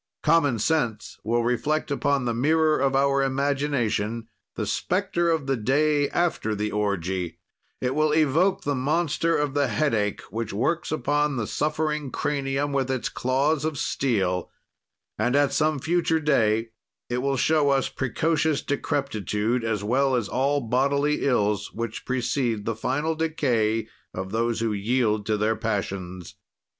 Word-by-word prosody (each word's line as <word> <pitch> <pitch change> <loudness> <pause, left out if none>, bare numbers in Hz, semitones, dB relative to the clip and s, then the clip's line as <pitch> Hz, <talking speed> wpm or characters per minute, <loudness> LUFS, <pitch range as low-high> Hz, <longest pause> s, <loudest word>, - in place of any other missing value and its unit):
"Common 145 -7 +3
sense 120 -3 -1
will 120 +2 +1
reflect 125 +6 0
upon 140 -2 +1
the 120 - 0
mirror 155 +5 +2
of 135 -1 +1
our 140 0 +3
imagination 135 -5 -1 0.3
the - - -2
specter 180 -2 0
of 160 -4 0
the 135 0 +1
day 145 +5 +2
after 165 -11 0
the 105 +1 -2
orgy; 95 -4 -2 0.4
it 125 0 -1
will 155 +1 +2
evoke 160 +5 +2
the 145 - 0
monster 160 +4 +1
of 145 -2 -1
the 140 -1 +2
headache 110 -4 0
which 115 -1 -3
works 140 +11 -1
upon 150 -2 0
the 115 -3 -1
suffering 150 +2 -1
cranium 140 0 -1
with 135 -2 0
its 130 -3 -1
claws 135 +4 0
of 155 -2 -2
steel; 95 -12 0 0.7
and, 120 +4 +1
at 145 -1 +3
some 155 -1 +2
future 165 +2 +1
day, 115 -7 +2 0.4
it 120 0 -1
will 135 +1 0
show 150 +1 +3
us 135 -1 +2
precocious 150 +3 0
decrepitude 120 - -1
as 110 -3 -1
well 130 +4 +2
as 120 -5 0
all 140 +4 +1
bodily 140 +5 +1
ills 105 -6 +1
which 115 -1 -5
precede 120 -3 -1
the 115 - -1
final 135 +8 -1
decay 125 -9 0 0.3
of 95 +1 -5
those 115 +1 0
who 115 -2 0
yield 105 0 0
to 110 -1 +1
their 110 +2 +1
passions. 95 -5 -4
135 Hz, 150 wpm, -25 LUFS, 110-150 Hz, 0.7 s, Common